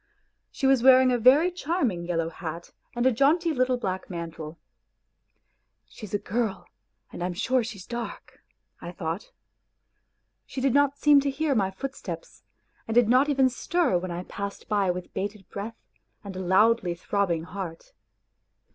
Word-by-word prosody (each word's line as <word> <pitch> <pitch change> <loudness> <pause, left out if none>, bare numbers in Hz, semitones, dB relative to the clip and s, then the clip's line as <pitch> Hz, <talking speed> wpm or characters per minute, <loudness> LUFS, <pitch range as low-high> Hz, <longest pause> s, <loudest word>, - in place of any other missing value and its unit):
She 275 - -4
was 265 -2 +4
wearing 260 0 +7
a 245 - +1
very 280 +10 +5
charming 285 - -1
yellow 165 -2 -1
hat 170 0 -7 0.2
and 240 +1 0
a 260 - +6
jaunty 310 +7 +2
little 255 -2 +1
black 190 -5 -4
mantle. 165 -2 -6 0.7
" 115 +1 -48
She's 195 - -10
a - - +3
girl, 205 -2 -2 0.5
and - - -7
I 175 - 0
am 180 - -5
sure 250 +5 +1
she 225 -2 -6
is 185 - -11
dark," 240 0 -7 0.4
1 175 - -8
thought. 170 +2 -4 1.2
She - - -6
did 260 -1 +2
not 285 0 +3
seem 295 -1 +6
to 280 0 0
hear 290 +2 0
my 200 -6 +1
footsteps, 275 - -7 0.5
and 225 - -3
did 240 -2 +5
not 260 +4 +4
even 270 -2 +4
stir 260 - 0
when 185 +1 -5
I 175 +1 -4
passed 200 +1 -6
by 200 -3 +1
with 180 0 -4
bated 200 0 -4
breath 220 +3 -6 0.5
and 200 -2 -8
loudly 195 -2 +3
throbbing 175 -2 -1
heart. 170 -1 -7
220 Hz, 165 wpm, -26 LUFS, 180-265 Hz, 1.2 s, wearing